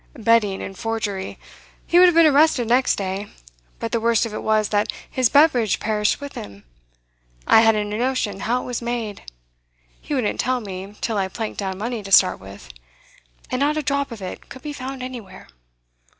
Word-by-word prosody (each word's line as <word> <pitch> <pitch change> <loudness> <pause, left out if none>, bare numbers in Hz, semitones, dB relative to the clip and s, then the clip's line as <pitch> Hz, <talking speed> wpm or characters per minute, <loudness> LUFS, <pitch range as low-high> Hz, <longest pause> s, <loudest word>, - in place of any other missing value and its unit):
'Betting 225 -4 +2
and 195 - -7
forgery. 215 -4 -3 0.5
He 350 - +4
would 365 - +8
have 350 - +3
been 335 0 +7
arrested 290 -5 +4
next 250 +3 +3
day. 195 +1 -4 0.5
But 230 - -4
the 235 - +1
worst 230 0 +2
of 225 - -6
it - - -4
was 215 -1 +1
that 205 0 +1 0.2
his 255 -3 +1
beverage 255 -8 +4
perished 210 -1 0
with 285 0 -8
him. 100 0 -9 0.8
I 220 - +6
hadn't 210 -2 +2
a - - -2
notion 245 -6 -1
how 240 +5 -1
it - - -9
was 245 -1 -4
made; 235 -4 -4 0.8
he 295 - -4
wouldn't 245 -6 -1
tell 255 0 +1
me 195 -1 -8
till 220 -3 -1
I 190 - 0
planked 220 +3 -5
down 190 -2 -3
money 230 +2 -3
to 195 -1 -9
start 185 -1 +5
with; 95 -11 -12 0.8
and 255 - -1
not 295 +2 +1
a 305 - -1
drop 280 -1 -1
of 220 -4 -8
it 185 - -8
could 260 - -11
be 300 -1 -5
found 265 -1 -6
anywhere. 230 -7 -9
225 Hz, 195 wpm, -22 LUFS, 205-255 Hz, 0.8 s, would